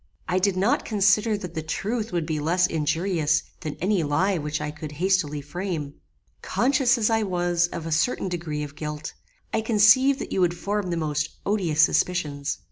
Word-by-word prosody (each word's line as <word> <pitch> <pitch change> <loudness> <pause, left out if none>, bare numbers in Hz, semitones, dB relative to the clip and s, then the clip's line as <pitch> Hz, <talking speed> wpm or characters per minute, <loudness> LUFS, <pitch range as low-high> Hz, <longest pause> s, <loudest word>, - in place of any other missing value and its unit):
I 180 +1 +1
did 190 0 +1
not 225 +10 +2
consider 210 +1 +2
that 180 -3 -7
the 160 - -3
truth 215 +8 -3
would 170 -3 -1
be 155 -1 -2
less 175 +5 +2
injurious 160 0 0 0.2
than 155 -4 -5
any 190 0 +1
lie 170 +5 +1
which 150 0 -3
I 150 0 -3
could 150 0 -8
hastily 165 -3 0
frame. 155 -1 -4 0.5
Conscious 260 -1 +2
as 225 -1 +1
I 225 0 +2
was 175 -3 +1
of 170 -2 -6
a 165 - -4
certain 180 +6 +1
degree 165 -4 -3
of 145 -1 -8
guilt, 150 0 -5 0.4
I 220 - +1
conceived 225 +5 +5
that - - -6
you 190 - 0
would 175 -1 +2
form 205 +1 -2
the 170 - -1
most 150 -1 -1 0.2
odious 175 -7 +2
suspicions. 150 -5 0
175 Hz, 185 wpm, -25 LUFS, 155-205 Hz, 0.5 s, conceived